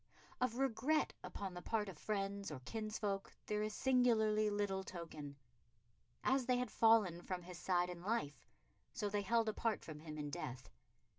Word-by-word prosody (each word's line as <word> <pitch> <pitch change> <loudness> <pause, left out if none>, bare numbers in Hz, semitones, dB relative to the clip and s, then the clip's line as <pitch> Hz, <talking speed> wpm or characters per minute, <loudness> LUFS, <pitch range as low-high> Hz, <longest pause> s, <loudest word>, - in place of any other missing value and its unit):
Of 250 -2 +1
regret 270 +3 +2
upon 195 -2 -5
the 180 - -6
part 215 +2 0
of 190 - -6
friends 200 +2 -2
or 150 -4 -5
kinsfolk 215 - -2
there 210 0 0
is 215 0 -2
singularly 220 -5 +4
little 205 -2 0
token. 160 -6 -7 0.9
As 260 -1 +2
they 250 -1 +4
had 250 -2 -1
fallen 215 -7 +5
from 180 0 -4
his 180 0 -8
side 180 -1 +2
in 175 -1 -7
life, 175 - -2 0.5
so 205 - -1
they 205 0 0
held 230 +2 +2
apart 220 0 0
from 155 -2 -7
him 155 -1 -7
in 145 -1 -3
death. 130 -7 -5
205 Hz, 165 wpm, -39 LUFS, 175-225 Hz, 0.9 s, fallen